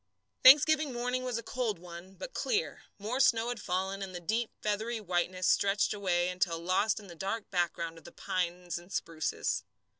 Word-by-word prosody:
Thanksgiving 300 +2 +7
morning 250 +1 -1
was 250 -2 -2
a 230 - -5
cold 235 -6 -2
one, 175 +2 -11
but - - -8
clear. 465 0 -1
More 220 +6 -3
snow 235 -3 +4
had 245 -3 -4
fallen, 190 +2 -2
and 190 -2 -6
the - - -4
deep, 220 +7 -1
feathery 220 +2 -1
whiteness 185 -1 -1
stretched 200 +2 +3
away 180 -3 +1
until 180 -2 0
lost 185 +6 +1
in 210 - -12
the 180 - -10
dark 195 +6 -4
background 170 -2 -1
of - - -22
the - - -11
pines 175 -1 -3
and 175 +2 -17
spruces. 155 - -2
195 Hz, 180 wpm, -31 LUFS, 175-230 Hz, -, Thanksgiving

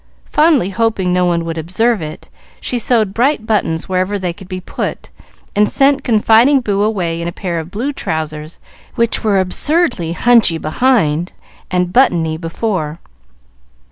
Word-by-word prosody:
Fondly 300 - +2
hoping 200 -4 0
no 180 0 +2
one 170 -1 0
would 165 0 -4
observe 200 +6 0
it, 155 0 -8 0.3
she 245 - -2
sewed 220 -4 +1
bright 245 0 +1
buttons 200 -7 -1
wherever 185 +2 -1
they 180 -3 -3
could 185 +2 -13
be 185 -1 -5
put, 185 - -5 0.4
and 210 0 +3
sent 275 0 +2
confiding 230 +4 +4
Boo 205 -5 -1
away 180 -6 -1
in 170 - -3
a - - -2
pair 175 -1 -4
of 160 +1 -7
blue 245 +10 -3
trousers, 155 - -4 0.4
which 230 -1 0
were 205 -3 +2
absurdly 190 - 0
hunchy 230 -5 +3
behind 170 - +1 0.4
and 180 -1 -1
buttony 170 -11 +3
before. 165 -1 -3
190 Hz, 150 wpm, -16 LUFS, 170-230 Hz, 0.4 s, confiding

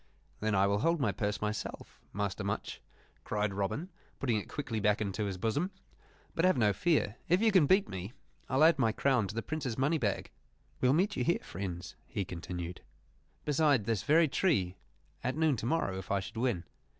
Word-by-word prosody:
"Then 110 -1 0
I 95 0 +4
will 100 +1 +2
hold 165 +6 +2
my 135 - +2
purse 105 -2 -2
myself, 105 0 -4
Master 100 0 -2
Much," 100 +1 -3 0.4
cried 105 -1 -1
Robin, 100 - -2 0.3
putting 120 -5 +1
it 105 - -5
quickly 120 -6 -3
back 105 0 +2
into 105 0 -2
his 95 -2 -3
bosom. 115 - 0 0.6
"But 165 - 0
have 185 -5 +4
no 105 -4 +4
fear; 145 -9 +1
if 180 +2 +5
you 225 0 +4
can 185 -7 +5
beat 190 +4 +4
me, 95 +2 -6 0.4
I'll 135 +3 +3
add 160 -2 +6
my 115 -4 +3
crown 125 -6 +2
to 105 - -7
the 115 - -2
Prince's 140 -7 -3
money 145 +5 +2
bag. 105 -6 -1 0.5
We 125 - +3
will 135 - +5
meet 190 +6 +2
you 125 - 0
here, 170 - +1
friends," 90 -2 -6
he 100 - -3
continued, 85 0 -6 0.6
"beside 145 -6 +3
this 110 -4 0
very 160 +2 +4
tree, 130 - +1 0.5
at 130 +3 -1
noon 160 -3 +3
to 115 - -3
morrow, 120 -11 0
if 95 - -10
I 100 - +2
should 95 +3 -8
win. 115 -8 0
115 Hz, 200 wpm, -32 LUFS, 100-150 Hz, 0.6 s, add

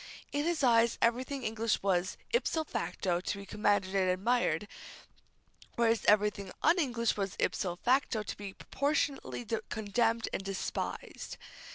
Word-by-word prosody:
In 290 +1 0
his 335 -3 0
eyes, 235 -2 +4
everything 255 +4 0
English 225 -1 0
was 185 -2 +1
ipso 335 -9 +1
facto 180 - -1
to 200 - -3
be 200 - -8
commended 205 -2 +1
and 190 -2 +2
admired, 200 -1 +1 1.1
whereas 230 -2 +2
everything 205 -2 +3
un 335 +3 +5
English 240 -7 +1
was 195 -2 -2
ipso 180 -3 0
facto 245 +1 +1
to - - -5
be 200 -2 -7
proportionately 280 -2 -1 0.2
condemned 225 +2 0
and - - -2
despised. 195 -1 -4
220 Hz, 135 wpm, -32 LUFS, 195-250 Hz, 1.1 s, un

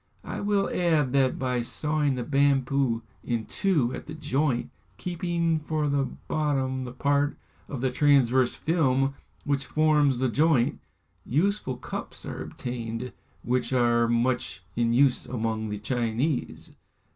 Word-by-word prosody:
I - - -5
will 205 -1 +1
add 155 -7 +2
that 135 -2 +3
by 125 -2 0
sawing 150 +3 0
the 125 - -3
bamboo 135 -3 +2 0.2
in 115 -2 -2
two 150 -11 +1
at - - -7
the 155 - -6
joint, 145 -4 0 0.3
keeping 170 -2 -1
for 155 0 -1
the 140 -1 +1 0.2
bottom 135 -4 0
the 125 - -6
part 145 +3 +1 0.3
of 135 -4 -4
the 130 -1 +1
transverse 130 -2 +3
film 135 -5 +1 0.3
which 140 -1 0
forms 150 -1 +3
the 130 +1 +1
joint, 145 -2 +2 0.4
useful 160 - 0
cups - - -7
are - - -5
obtained, 120 0 -5 0.3
which 125 +2 0
are 120 -2 +3
much 120 -3 0
in 115 0 +2
use 130 +2 +3
among 110 -2 -2
the 105 - -3
Chinese. 120 +5 -2
135 Hz, 135 wpm, -27 LUFS, 120-150 Hz, 0.4 s, that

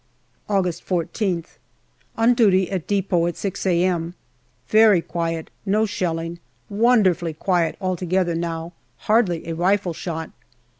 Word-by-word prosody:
August 180 -4 0
14th. 175 0 -2 0.6
On 230 +2 +4
duty 195 -6 +3
at 185 -5 -3
depot 190 -4 +1
at 175 - -4
6 195 -1 -3
a.m. 175 -1 +1 0.5
Very 215 -1 +6
quiet, 165 -1 -3
no 215 +2 +2
shelling. 170 -5 -3 0.3
Wonderfully 200 -7 +2
quiet 175 0 0
altogether 185 -1 0
now: 165 0 -4 0.3
hardly 210 -7 +2
a 165 - -2
rifleshot. 175 -2 -1
180 Hz, 110 wpm, -22 LUFS, 170-200 Hz, 0.6 s, Very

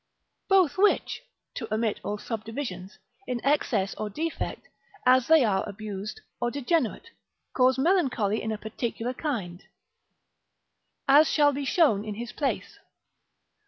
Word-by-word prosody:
Both 385 -3 +3
which 415 +1 +2 0.3
(to 225 -4 -6
omit 220 -1 0
all 210 - -3
subdivisions) 220 -4 -6 0.3
in 250 -1 -2
excess 225 -9 +1
or 215 - -2
defect, 320 +10 -4 0.4
as 255 0 +5
they 320 -5 +6
are 190 -3 +1
abused, 205 0 -6 0.2
or 240 - +1
degenerate, 280 -1 -1 0.4
cause 255 0 +3
melancholy 265 - +1
in 220 - -3
a 215 - -2
particular 230 +3 -4
kind, 210 - -4 1.5
as 290 +3 +6
shall 290 -2 +4
be 280 +1 -3
shown 270 - +3
in 215 -1 -5
his 235 +2 -6
place. 285 -3 -3
240 Hz, 125 wpm, -27 LUFS, 210-290 Hz, 1.5 s, they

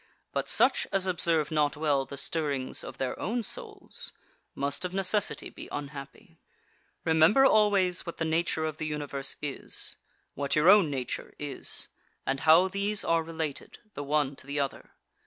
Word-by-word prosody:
But - - -1
such - - +3
as 195 -1 +2
observe 170 -4 +2
not 150 -2 +1
well 145 -3 +1
the 140 - -8
stirrings 140 -2 -2
of - - -8
their 130 -1 -3
own 230 +4 -1
souls 425 - -5 0.4
must 140 +4 -1
of 180 0 -3
necessity 195 +1 +1
be - - -9
unhappy. 140 -1 -8 0.7
9. 160 - +3
Remember 165 +12 +6
always 200 -6 +3
what 170 - -7
the 165 - -1
nature 160 0 0
of 155 -1 -3
the 155 - -3
Universe 145 -2 -2
is, 145 -2 -3 0.4
what 140 0 -1
your 155 +4 +5
own 200 -6 +6
nature 130 -3 -4
is, 145 -2 -4 0.4
and 135 +1 0
how 160 +5 +6
these 200 +2 +1
are 165 0 +3
related 160 -3 -5 0.2
the 145 - -5
one 145 -1 +1
to - - -14
the 145 +1 -2
other. 140 -1 -3
155 Hz, 165 wpm, -29 LUFS, 145-185 Hz, 0.7 s, Remember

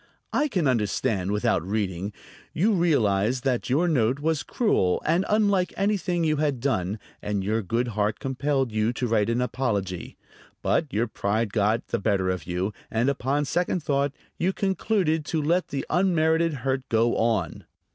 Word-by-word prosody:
"I 300 - +2
can 185 - 0
understand 105 -4 0
without 105 -2 +1
reading. 100 -1 -2 0.4
You 200 +8 +2
realized 125 - +2
that 125 -3 0
your 155 +8 +2
note 130 -5 +2
was 155 0 0
cruel 95 - +1
and 170 +4 +2
unlike 200 -4 +2
anything 195 -4 0
you 155 -1 +2
had 145 -4 0
done, 105 -7 -1 0.2
and 105 -2 -2
your 110 +3 0
good 115 +5 -1
heart 105 -1 0
compelled 135 -1 -1
you 110 +2 +1
to 125 - -2
write 110 -2 +1
an 120 +1 +1
apology; 105 -8 -2 0.5
but 155 -5 +1
your 110 +3 +1
pride 110 0 -1
got 110 +2 +1
the - - 0
better 95 -3 +1
of 90 - -4
you, 90 +4 -2 0.2
and 115 +4 +1
upon 140 +2 -1
second 175 +3 -1
thought 140 -1 +1 0.3
you 185 +3 +1
concluded 190 -5 0
to 160 - -1
let 170 +5 +1
the 140 - -4
unmerited 165 -2 +2
hurt 130 0 -1
go 115 +1 +2
on." 110 -8 0
130 Hz, 165 wpm, -25 LUFS, 105-160 Hz, 0.5 s, I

